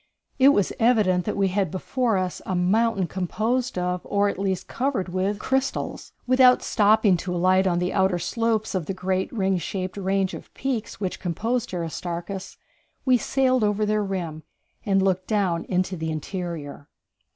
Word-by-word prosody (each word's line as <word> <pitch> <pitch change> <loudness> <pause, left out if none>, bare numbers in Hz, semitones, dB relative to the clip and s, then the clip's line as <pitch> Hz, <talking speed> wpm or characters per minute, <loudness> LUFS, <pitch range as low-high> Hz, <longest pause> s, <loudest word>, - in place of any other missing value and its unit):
It 265 +1 +8
was 205 -9 +2
evident 210 -7 +3
that 210 - -2
we 195 -1 +2
had 190 -1 0
before 225 - 0
us 185 -1 -2
a 185 - -2
mountain 195 +3 +2
composed 215 +8 -1
of, 180 0 -1
or 200 0 +1
at - - -5
least 190 -2 -2
covered 250 -8 -1
with, 190 +3 -1
crystals. 265 +5 -2
Without 255 0 +5
stopping 210 -3 +4
to 180 +1 -4
alight 185 +2 +3
on 175 -2 +1
the 180 +1 -1
outer 190 -2 +2
slopes 220 +5 -1
of 180 -5 -2
the 195 - -3
great 185 0 -1
ring 190 -5 0
shaped 185 +3 -4
range 195 -1 0
of - - -9
peaks 255 -8 -3
which 190 -3 -3
composed 225 +8 -2
Aristarchus, 175 +2 -5 0.5
we 255 -1 +5
sailed 255 0 +2
over 210 0 +1
their 210 0 +1
rim 175 -5 -4 0.5
and 195 -1 +3
looked 185 -1 0
down 190 -6 0
into 185 0 -1
the 160 -1 -3
interior. 155 -3 -5
190 Hz, 165 wpm, -24 LUFS, 180-220 Hz, 0.5 s, It